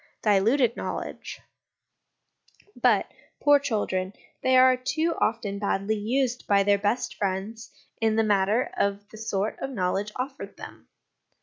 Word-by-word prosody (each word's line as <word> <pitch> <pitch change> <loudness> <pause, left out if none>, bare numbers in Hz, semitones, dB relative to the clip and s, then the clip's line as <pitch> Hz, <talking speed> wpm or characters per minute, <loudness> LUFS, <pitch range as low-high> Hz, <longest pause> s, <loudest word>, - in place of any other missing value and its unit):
Diluted 225 +4 +3
Knowledge. - - -6 1.3
But, - - +2 0.3
poor 290 0 +5
children, 205 -8 -2 0.3
they 260 0 +4
are 255 0 +6
too 310 +6 -1
often 215 -3 -1
badly 200 +1 0
used 250 +3 -1
by 200 -1 +4
their 200 0 +3
best 205 +5 -1
friends 200 +3 -4 0.3
in 220 -1 +2
the 225 - +3
matter 210 +3 +1
of 200 0 -1
the 220 - -12
sort 215 -2 -2
of 270 - -4
knowledge 200 -2 -1
offered 265 +2 -6
them. - - -11
220 Hz, 130 wpm, -26 LUFS, 200-255 Hz, 1.3 s, are